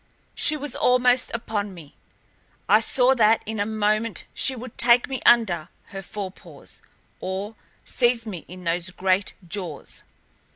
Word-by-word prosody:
She 305 - +1
was 290 -2 -4
almost 250 0 +3
upon 210 -4 -3
me. 155 -5 -13 0.7
I 210 +2 +6
saw 250 +3 +3
that 225 -3 +4
in 220 0 -4
a 205 - 0
moment 215 0 0
she 265 - 0
would 250 -1 -9
take 240 +1 +5
me 265 -2 -4
under 180 -9 +4 0.2
her 195 - -7
forepaws, 195 0 -9 0.4
or 190 +3 -4 0.3
seize 240 -2 +1
me 190 -7 -6
in 180 +1 -11
those 170 +2 -1
great 185 +1 0
jaws. 170 -5 -5
215 Hz, 140 wpm, -24 LUFS, 190-240 Hz, 0.7 s, I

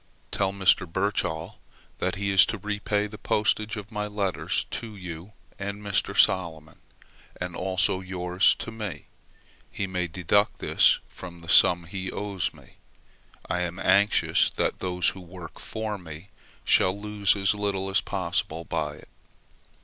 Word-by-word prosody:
Tell 95 -1 +1
Mr. 95 -3 +2
Birchall 90 -4 -2 0.4
that 90 +3 -1
he 100 0 -1
is 95 -1 +8
to 115 - -2
repay 105 +1 -1
the 105 0 -9
postage 110 +2 +1
of 105 +1 -8
my 105 -1 -2
letters 100 -3 -1
to 110 -2 -4
you 90 +1 -8 0.3
and 100 0 -4
Mr. 100 -1 -1
Salomon, 80 -4 +1 0.6
and 90 -1 -4
also 95 0 +1
yours 90 0 +2
to 115 - -6
me; 110 -5 -6 0.6
he 100 - -3
may 90 -2 -2
deduct 90 +4 +1
this - - +4
from 85 -2 -11
the 85 - -11
sum 85 +1 +6
he 95 +2 -5
owes 100 -3 -2
me; - - -19 0.7
I 90 - -1
am 90 0 -3
anxious 100 +2 +3
that - - 0
those 90 -1 +1
who 95 - -8
work 90 -1 -11
for 110 -2 -4
me 80 +2 -10 0.4
should 95 +1 +4
lose 105 0 +1
as 95 -1 +2
little 100 -2 -2
as 95 +1 +2
possible 85 -3 -2
by - - -2
it. - - -16
95 Hz, 150 wpm, -26 LUFS, 90-105 Hz, 0.7 s, is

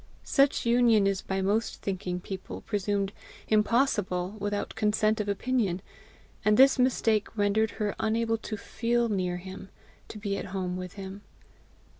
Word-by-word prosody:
Such 275 -2 +2
union 235 -3 +4
is 195 -1 +1
by 190 0 -2
most 210 +4 0
thinking 180 -2 -2
people 190 +1 -7
presumed 200 -1 -1 0.3
impossible 210 -4 +1
without 205 0 -2
consent 215 0 +1
of 205 - -3
opinion, 200 -3 0 0.6
and 210 0 +4
this 270 0 +6
mistake 225 -4 +1
rendered 210 +2 +2
her 210 -2 -1
unable 225 0 +1
to 215 -1 -5
FEEL 235 +3 0
near 180 -3 -1
him, 190 +2 -9 0.4
to - - -9
be 200 -1 -2
at - - -5
home 185 -2 -3
with 180 -1 -6
him. 195 0 -8
205 Hz, 145 wpm, -28 LUFS, 195-225 Hz, 0.6 s, this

